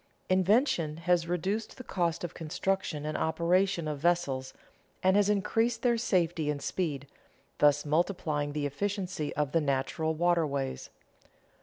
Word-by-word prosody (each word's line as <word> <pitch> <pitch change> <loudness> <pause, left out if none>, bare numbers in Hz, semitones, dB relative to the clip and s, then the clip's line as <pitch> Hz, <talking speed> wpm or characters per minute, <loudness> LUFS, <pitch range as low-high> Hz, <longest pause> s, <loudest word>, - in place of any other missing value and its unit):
Invention 185 - +2
has 170 0 +1
reduced 190 +6 -2
the 255 - -8
cost 175 -6 -1
of 175 - -4
construction 165 -1 -2
and 155 - -3
operation 170 +2 +1
of 150 -2 -3
vessels 145 -6 0 0.5
and 190 +1 +4
has 205 0 +4
increased 225 +3 +1
their 240 -1 +4
safety 175 -8 0
and 145 -1 -1
speed, 145 -3 -2 0.5
thus 145 0 +4
multiplying 150 -2 0
the 150 -1 -2
efficiency 185 0 -2
of 150 -1 0
the 165 - +2
natural 145 +3 -1
waterways. 155 -6 0
170 Hz, 135 wpm, -30 LUFS, 150-190 Hz, 0.5 s, and